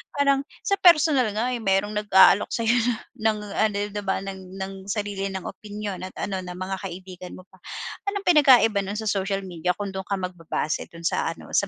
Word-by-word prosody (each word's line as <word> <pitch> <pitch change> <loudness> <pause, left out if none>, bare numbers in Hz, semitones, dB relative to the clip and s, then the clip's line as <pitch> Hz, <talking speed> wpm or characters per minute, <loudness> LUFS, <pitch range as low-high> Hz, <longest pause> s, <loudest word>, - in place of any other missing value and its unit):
Parang 280 -1 +3 0.2
sa 395 - +2
personal 305 - +5
nga, 240 +4 0
eh, 245 - -2
merong 205 0 +1
nag-aalok 205 -1 +6
sa'yo 230 0 +1
na 240 0 +1 0.4
ng 215 - -5 0.2
ano, 215 -1 +2 0.2
di 205 0 -4
ba 190 -1 0
ng 190 -1 -8
ng 190 0 -4 0.2
sarili 205 -2 -2
nilang 190 -1 -5
opinyon 205 -3 -6
at - - -14
ano, 195 -2 -2
na 180 0 -7
mga 185 +1 -3
kaibigan 185 -1 -8
mo 185 - -12
pa. 185 - -22 0.5
Anong 400 0 -2
pinagkaiba 260 - +6
nun 200 +2 -4
sa 220 - -4
social 195 0 -1
media 180 -1 -2
kung 200 0 -4
dun 190 0 -6
ka 200 - 0
magbabase, 175 -4 -3
dun 165 -1 -12
sa - - 0
ano, - - -13
sa - - +2
200 Hz, 200 wpm, -24 LUFS, 190-225 Hz, 0.5 s, nag-aalok